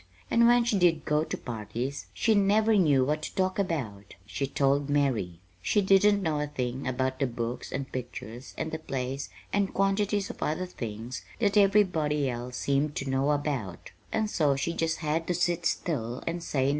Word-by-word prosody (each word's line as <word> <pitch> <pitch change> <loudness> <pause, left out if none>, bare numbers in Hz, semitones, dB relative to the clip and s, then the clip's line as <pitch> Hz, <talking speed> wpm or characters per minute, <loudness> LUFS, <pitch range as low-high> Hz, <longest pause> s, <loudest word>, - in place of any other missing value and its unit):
And 235 0 +5
when 240 0 +5
she 230 -4 +1
did 165 -3 +3
go 150 0 +2
to - - -4
parties, 120 +4 -5
she 225 - +2
never 215 +2 +4
knew 145 -9 +4
what 150 +2 0
to - - -6
talk 185 +1 0
about, 120 - -3
she 135 +6 -3
told 140 +1 +1
Mary. 125 -12 0 0.2
She 210 - +2
didn't 200 +1 +4
know 155 -3 0
a 150 - -1
thing 130 -2 -3
about 130 +1 -1
the 135 - +2
books 120 0 -4
and 135 0 -4
pictures 125 -1 -7
and 160 - -3
the 160 - -3
plays 135 -2 -4 0.2
and 200 -1 +1
quantities 195 +1 +1
of - - -15
other 160 +4 -1
things 115 -6 -6
that 205 -3 +1
everybody 180 -8 +3
else 125 0 -4
seemed 140 +2 0
to 135 - -3
know 135 +2 +1
about; 140 - -2 0.2
and 220 -1 +1
so 150 -9 +2
she 135 +5 -1
just 165 0 -1
had 160 +2 0
to 180 - 0
sit 175 -1 +1
still 125 -7 -2
and 170 +1 -2
say 140 -4 -1
nothin'. - - +3
150 Hz, 190 wpm, -28 LUFS, 130-185 Hz, 0.2 s, And